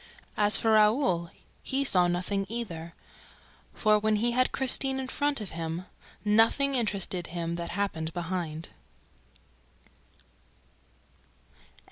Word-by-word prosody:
As 210 0 +4
for 225 - +1
Raoul, 215 -5 +3 0.3
he 270 +1 -1
saw 180 -9 +4
nothing 185 +3 -1
either; 170 -8 -5 0.8
for, 215 -1 +3
when 215 0 +1
he 235 +3 +1
had 255 +1 +2
Christine 265 0 0
in 260 - -4
front 285 +1 -1
of 210 -4 -6
him, 165 +2 -4 0.4
nothing 225 +7 +4
interested 200 -7 -1
him 170 -1 -4
that 170 0 -5
happened 170 -4 -2
behind. 170 -2 -4
205 Hz, 110 wpm, -28 LUFS, 170-235 Hz, 0.8 s, As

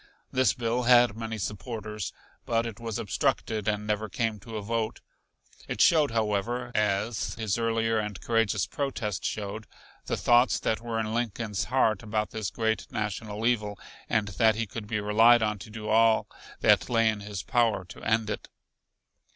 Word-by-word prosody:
This 130 -5 +3
bill 120 +1 0
had 120 -3 +6
many 115 0 -4
supporters, 105 0 -5 0.4
but 115 0 +1
it 115 -2 -6
was 115 -2 -4
obstructed 110 -1 -1
and 105 0 0
never 105 0 -1
came 110 +1 -1
to 115 +1 -7
a - - -3
vote. 110 +1 -2 0.7
It - - -4
showed, 155 -3 +5
however, 115 +2 -1
as 105 +1 0
his 110 -3 -1
earlier 115 -1 +1
and 105 -2 -4
courageous 115 -4 +1
protest 130 -8 -3
showed, 105 +1 -4 0.4
the - - -1
thoughts 120 +1 +4
that 110 - 0
were 115 -1 -3
in 110 0 -2
Lincoln's 110 -4 -2
heart 110 -3 +2
about 105 -1 -2
this 110 -3 -3
great 110 +2 -1
national 105 +1 -3
evil, 105 -4 +1 0.3
and 105 -2 +1
that 110 +3 +3
he 115 +1 -1
could 105 +1 -7
be 105 -1 -1
relied 110 +3 +5
on 105 -1 -1
to 105 - -10
do 110 0 -7
all 110 0 +4 0.4
that - - +4
lay 115 -1 +3
in 110 -1 +1
his 100 -2 -6
power 115 -6 +1
to - - -12
end 110 -1 +1
it. - - -5
110 Hz, 170 wpm, -28 LUFS, 105-115 Hz, 0.7 s, had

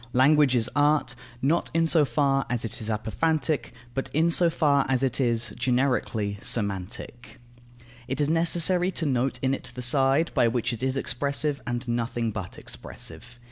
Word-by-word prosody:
Language 140 +1 +4
is 115 -1 +1
art, 145 -2 +2 0.3
not 160 +6 +1
in 165 0 +3
so 160 -2 +4
far 135 -1 +1
as 120 -2 -1
it 115 - -6
is 110 - -4
apophantic, 150 +8 -1 0.2
but 135 +1 -3
in 165 +2 +3
so 170 +1 +5
far 145 -3 +2
as 130 0 +1
it 135 0 +1
is, 120 -2 +1
generically, 120 -5 0
semantic. 115 +5 -3 0.7
It 135 +2 -3
is 145 - +2
necessary 170 +3 +3
to 165 - -3
note 130 -1 0
in 130 0 +2
it 125 -2 -4
the 125 - -5
side 135 +5 +2
by 120 - +3
which 120 +1 -1
it 115 - -6
is 130 +1 -1
expressive, 140 +3 -1
and 120 +1 -3
nothing 120 -1 -1
but 95 -2 -7
expressive. 120 +10 -9
130 Hz, 170 wpm, -26 LUFS, 120-150 Hz, 0.7 s, so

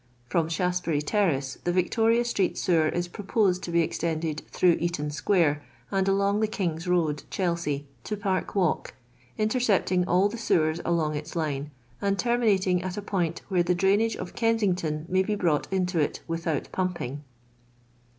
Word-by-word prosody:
From 160 +6 0
Shaftesbury 175 -3 0
ter 205 +6 +2
race 135 -4 -2
the 175 - +1
Victoria 225 +6 +2
street 200 -6 0
sewer 160 -3 +2
is 175 0 -2
proposed 195 -1 0
to 175 - -5
be 170 0 +3
extended 160 -1 -2
through 175 -2 +3
Eaton 160 -3 -2
square 155 -2 +2 0.3
and 195 0 +1
along 200 +2 +2
tbe 215 -1 0
King's 170 -4 -2
road, 165 -4 +1
Chelsea, 170 -6 -1 0.2
to 210 - -3
Park 195 -1 -2
walk, 180 -5 0 0.4
intercepting 215 -5 +1
all 185 +3 +4
the 230 +3 -6
sewers 160 -7 +1
along 165 -3 +1
its 150 - -6
line, 150 -3 -2 0.3
and 200 0 +1
terminating 200 -7 +2
at 185 +2 -4
a - - -2
point 175 -5 -2
where 185 -3 +2
the 175 +1 +1
drainage 200 +5 +2
of 180 -1 -7
Kensington 185 -9 0
may 185 +1 +2
be 210 +2 -1
iarought 165 -6 +1
into 180 -2 0
it 150 - -1
without 165 -3 -2
pumping." 170 -7 -3
180 Hz, 160 wpm, -27 LUFS, 160-200 Hz, 0.4 s, all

